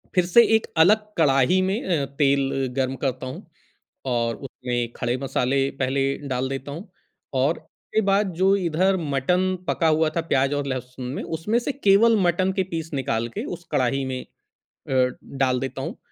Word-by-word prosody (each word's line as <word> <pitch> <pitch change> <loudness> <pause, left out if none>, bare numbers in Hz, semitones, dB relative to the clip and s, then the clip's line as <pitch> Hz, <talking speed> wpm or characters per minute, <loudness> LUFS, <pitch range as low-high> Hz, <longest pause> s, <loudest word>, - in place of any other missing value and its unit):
फिर 180 -1 +4
से 210 +7 +6
एक 220 - 0
अलग 210 +7 +5
कड़ाही 145 +3 +4
में 190 +5 -1
अ, 140 - -1
तेल 135 -1 +1
गर्म 135 -1 0
करता 130 -1 -2
हूँ 130 - -8 0.7
और 115 -1 0
उसमें 120 -2 -4
खड़े 120 +1 -1
मसाले 135 0 0
पहले 135 +1 +1
डाल 130 +1 -1
देता 135 +1 -5
हूँ 175 +8 -8 0.5
और 145 +5 +1 0.4
के 220 - +5
बाद 195 -1 +2
जो 190 +3 +4
इधर 185 +1 +1
मटन 180 +6 0
पका 165 - +1
हुआ 155 0 +3
था - - +2
प्याज़ 135 -1 +2
और 145 -1 -2
लहसुन 130 -1 -5
में, - - -4
उसमें 170 +8 -1
से 245 - -2
केवल 230 -3 +4
मटन 185 +1 +2
के - - +3
पीस 165 -1 -4
निकाल 130 -4 -1
के 115 - -5
उस 175 - -16
कढ़ाही 135 +1 +1
में 130 -1 -3 0.5
अ, - - -9 0.5
डाल 125 -1 +2
देता 135 +1 -4
हूँ - - -5
140 Hz, 175 wpm, -24 LUFS, 130-180 Hz, 0.7 s, से